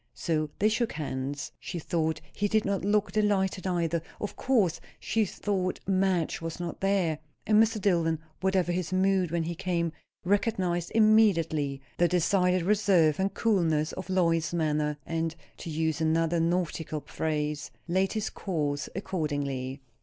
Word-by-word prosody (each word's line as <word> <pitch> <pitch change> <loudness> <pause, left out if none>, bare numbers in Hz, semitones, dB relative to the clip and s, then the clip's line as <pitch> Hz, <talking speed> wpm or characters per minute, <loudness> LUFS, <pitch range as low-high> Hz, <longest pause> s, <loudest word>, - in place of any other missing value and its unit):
So 155 -2 -1
they 210 - +3
shook 225 +2 0
hands. 140 -1 -4
She - - -6
thought 160 -1 -1
he 205 - 0
did 215 +1 +1
not 200 -2 -1
look 205 +1 +2
delighted 195 -3 +1
either. 170 -2 0 0.2
Of 210 - -4
course, 215 -11 +1 0.2
she 225 -1 +1
thought, 185 -1 -2
Madge 185 -4 +1
was 165 +1 -5
not 175 -1 -5
there. 190 -6 +1 0.3
And 215 0 +5
Mr. 225 0 +2
Dillwyn, 170 -5 +2 0.2
whatever 190 -2 +1
his 175 0 -2
mood 190 -1 +2
when 170 0 0
he 170 +1 -3
came, 170 -1 -1 0.3
recognized 185 -4 0
immediately 165 -11 +3 0.2
the 175 - +5
decided 180 +1 +2
reserve 190 -6 +3
and 195 +1 +1
coolness 165 -8 +2
of 185 0 -7
Lois's 170 -3 +1
manner, 150 -2 0
and, 165 0 -2 0.2
to - - -7
use 160 0 -1
another 165 +1 +2
nautical 165 -2 -1
phrase, 150 0 -2 0.2
laid 190 +2 +1
his 215 -1 -2
course 150 -6 -2
accordingly. 145 -8 -3
175 Hz, 145 wpm, -28 LUFS, 160-195 Hz, 0.3 s, And